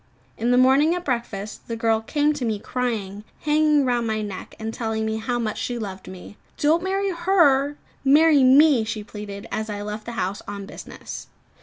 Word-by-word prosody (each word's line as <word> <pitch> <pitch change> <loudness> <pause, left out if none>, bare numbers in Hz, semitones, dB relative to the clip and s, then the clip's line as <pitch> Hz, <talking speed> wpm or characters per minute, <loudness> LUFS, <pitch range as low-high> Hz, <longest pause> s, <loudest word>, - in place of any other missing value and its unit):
In 235 - -1
the 245 - +4
morning 275 +6 +5
at 355 0 -5
breakfast, 225 -5 -4
the 230 - -3
girl 225 -1 +1
came 295 +6 +1
to 290 -3 -5
me 220 -3 0
crying; 210 -4 -3 0.2
hanging 300 -1 +3
round 240 -2 0
my 215 -1 -1
neck, 200 -3 -7
and 220 0 -5
telling 220 -2 -2
me 220 0 -1
how 240 +2 -2
much 220 -3 -2
she 245 - -3
loved 195 -4 -6
me. 190 +2 -10 0.2
"Don't 315 +3 +3
marry 390 +1 -1
her, 335 -6 +3 0.3
marry 295 +1 +5
me!" 270 -1 +6
she 220 -1 -4
pleaded, 205 -1 -8
as 220 0 -3
I 205 -1 -4
left 210 +1 -6
the 235 - -5
house 195 -2 -2
on 200 -1 -6
business. - - -9
235 Hz, 190 wpm, -23 LUFS, 215-290 Hz, 0.3 s, me